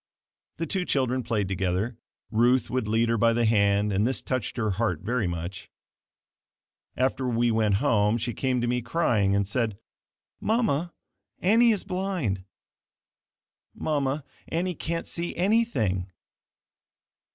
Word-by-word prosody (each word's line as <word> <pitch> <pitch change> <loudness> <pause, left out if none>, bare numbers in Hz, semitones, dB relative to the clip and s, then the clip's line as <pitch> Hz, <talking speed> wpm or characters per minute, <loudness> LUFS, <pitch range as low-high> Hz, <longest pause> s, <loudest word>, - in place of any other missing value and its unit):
The 165 - -2
two 185 +3 -1
children 130 -5 +1
played 110 -4 -1
together. 95 +5 -1 0.4
Ruth 120 +3 +3
would 125 -3 -1
lead 115 +2 +2
her 115 -1 +1
by 115 +1 +4
the 120 0 +2
hand 100 -1 +3
and 100 +4 +2
this 130 - 0
touched 130 -3 -2
her 110 -3 0
heart 95 -5 -1
very 115 0 0
much. 85 +2 -5 1.3
After 130 0 0
we 120 0 +2
went 110 -3 +2
home, 105 +2 +2
she 120 +1 -3
came 130 0 0
to 120 - 0
me 125 +1 0
crying, 115 -7 +1
and 100 -1 +1
said, 110 -1 -1 0.6
"Mama, 205 - +1 0.5
Annie 230 +6 +5
is 210 - 0
blind. 180 - -2 1.3
Mama, 145 -1 -1 0.2
Annie 180 +2 -1
can't 165 0 -3
see 170 0 -4
anything. 165 - +1
120 Hz, 135 wpm, -26 LUFS, 105-145 Hz, 1.3 s, Annie